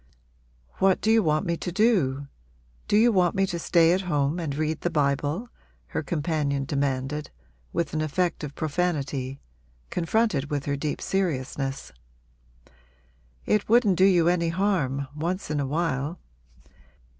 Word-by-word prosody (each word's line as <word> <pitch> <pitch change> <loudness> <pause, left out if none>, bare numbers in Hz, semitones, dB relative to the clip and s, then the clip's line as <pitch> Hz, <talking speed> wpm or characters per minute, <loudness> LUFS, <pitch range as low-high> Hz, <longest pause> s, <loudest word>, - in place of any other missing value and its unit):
'What 190 -1 +4
do 220 - +1
you 225 0 +5
want 155 -4 +1
me 170 - 0
to 180 - -4
do? 170 - +2 0.6
Do 205 - +3
you 235 +2 +5
want 180 -3 +2
me 195 0 +3
to 175 -2 -4
stay 170 0 +4
at 185 - +1
home 145 +2 +1
and 150 -5 -3
read 155 +1 -1
the 175 - 0
Bible?' 145 - 0 0.4
her - - -2
companion 150 -4 -1
demanded 140 0 -2 0.4
with 170 -2 -2
an 155 - 0
effect 170 +3 -1
of 145 -1 -6
profanity, 145 -5 -2 0.5
confronted 180 -4 0
with 145 -2 -2
her 140 - 0
deep 145 +1 -3
seriousness. 135 -7 -2 1.5
'It 210 -1 +1
wouldn't 225 -4 +5
do 190 - +7
you 175 -4 +4
any 170 -1 +2
harm, 165 -7 0
once 175 +4 -3
in 150 - 0
a 140 - -1
while.' 150 +1 -1
160 Hz, 145 wpm, -26 LUFS, 140-180 Hz, 1.5 s, do